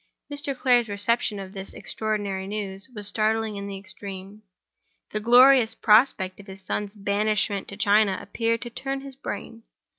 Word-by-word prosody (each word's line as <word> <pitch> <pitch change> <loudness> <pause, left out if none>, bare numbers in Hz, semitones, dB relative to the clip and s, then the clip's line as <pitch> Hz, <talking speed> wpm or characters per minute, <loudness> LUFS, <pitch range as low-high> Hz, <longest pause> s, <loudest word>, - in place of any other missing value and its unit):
Mr. 285 -2 -3
Clare's 245 -3 +3
reception 205 +1 0
of 190 0 -8
this 195 -1 -8
extraordinary 205 -3 -3
news 200 0 -5
was 205 -1 -2
startling 220 0 0
in 200 0 -5
the 200 -1 -5
extreme. 195 +1 -9 0.7
The 215 - -2
glorious 245 +1 +6
prospect 210 -4 +3
of 200 - -13
his 190 0 -10
son's 205 +2 -3
banishment 205 0 0
to 200 - -8
China 205 -2 +3
appeared 230 +3 -1
to 240 - -7
turn 270 +2 -3
his 275 -1 -6
brain. 230 -3 -7
210 Hz, 155 wpm, -25 LUFS, 200-230 Hz, 0.7 s, glorious